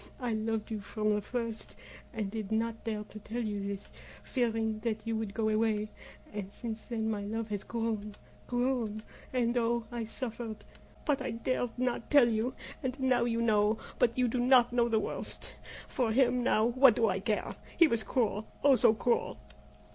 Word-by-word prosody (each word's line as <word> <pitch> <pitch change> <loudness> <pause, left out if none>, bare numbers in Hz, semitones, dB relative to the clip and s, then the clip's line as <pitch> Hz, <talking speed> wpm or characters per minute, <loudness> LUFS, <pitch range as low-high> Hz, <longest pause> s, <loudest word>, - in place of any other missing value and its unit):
I 245 -3 -1
loved 220 0 -2
you 215 - -2
from 215 +1 -1
the 210 - 0
first, 230 0 -4 0.4
and 215 -5 -3
did 220 -2 -4
not 225 0 -1
dare 215 -2 -2
to 215 0 -11
tell 235 +3 -4
you 205 -2 -2
this 200 0 -5 0.3
fearing 225 -3 0
that 215 -1 -2
you 225 0 -1
would 220 -2 -3
go 220 -1 +1
away; 215 -1 +1 0.4
and 200 -2 -5
since 220 0 -6
then 225 -3 -2
my 215 -2 -1
love 220 +2 -3
has 205 -1 -3
grown 220 -3 -3 0.3
grown 245 -4 0 0.3
and 245 -1 +1
oh! 235 0 +1
I 235 -2 -3
suffered! 225 -1 -6 0.4
but 285 -4 +1
I 260 - -2
dared 240 +1 -2
not 245 -2 -1
tell 285 -5 +7
you. 230 +2 0 0.3
And 260 +1 -3
now 255 -2 +3
you 230 -1 0
know, 215 -1 +3 0.2
but 235 0 +3
you 250 -1 +3
do 245 +2 -1
not 245 -1 +5
know 235 -1 +3
the 225 - +3
worst. - - -4 0.4
For 240 -3 0
him 250 +1 +3
now 220 -3 +3
what 255 +2 +6
do 230 - +3
I 190 -1 +1
care? 210 +2 -1 0.2
He 335 - +8
was 230 -6 +1
cruel 215 0 0 0.2
oh, 280 -1 +7
so 225 -3 +5
cruel!" 240 +2 0
225 Hz, 185 wpm, -31 LUFS, 215-245 Hz, 0.4 s, He